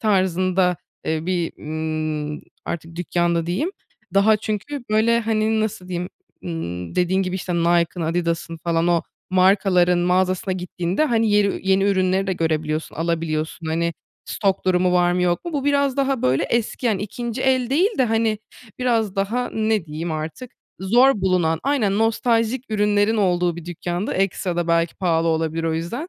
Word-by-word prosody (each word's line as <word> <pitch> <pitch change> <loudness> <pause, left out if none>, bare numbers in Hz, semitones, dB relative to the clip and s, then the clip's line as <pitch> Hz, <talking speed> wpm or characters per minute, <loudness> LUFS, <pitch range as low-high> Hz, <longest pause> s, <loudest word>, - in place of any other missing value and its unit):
tarzında, 185 -3 +2 0.3
ııı, 160 +1 -1
bir, 175 -3 -1
ımm, 155 -1 -3 0.2
artık 165 0 -6
dükkândı 170 0 0
diyeyim, 200 - -1 0.4
daha 210 +2 +5
çünkü 220 +6 -4
böyle, 230 +2 +3
hani, 220 0 +1
nasıl 215 -4 -3
diyeyim, 180 0 -3 0.4
ımm, 90 - -5
dediğin 185 +2 +2
gibi, 185 0 -2
işte, 180 -1 -3
Nike'ın, 170 +1 +2
Adidas'ın 165 0 -1
falan 170 0 +1
o 170 -1 +2 0.3
markaların 185 -1 +4
mağazasına 185 +1 +1
gittiğinde, 180 - -1
hani, 225 -5 +2
yeri 200 -2 +1
yeni 195 +1 +4
ürünleri 190 -1 +2
de 190 - 0
görebiliyorsun, 160 -2 -1
alabiliyorsun, 165 -1 -2
hani 170 +1 0 0.3
stok 195 -2 -1
durumu 180 -1 +2
var 175 0 +3
mı 180 0 0
yok 175 - 0
mu, 345 - -5
bu 280 -2 -2
biraz 280 -1 +2
daha 270 -2 0
böyle 130 +1 +2
eski, 235 +1 -1
yani 205 -3 +1
2. 235 +4 -4
el 260 -2 +2
değil 355 - +2
de, 260 - +5
hani, 225 -1 +1 0.4
biraz 225 -5 0
daha, 225 +6 -1
ne 215 -4 0
diyeyim, 160 +2 -4
artık 160 +11 -5 0.3
zor 240 +3 +4
bulunan, 175 -4 +1
aynen 230 -8 +1
nostaljik 230 +2 +1
ürünlerin 210 +1 +2
olduğu 180 -4 +1
bir 170 - -8
dükkânda, 175 +2 -3
ekstra 185 -2 -1
da 170 -1 -1
belki 170 0 +2
pahalı 165 -2 +1
olabilir 160 0 0
o 160 -1 0
yüzden. 235 - -4
185 Hz, 160 wpm, -22 LUFS, 170-220 Hz, 0.4 s, daha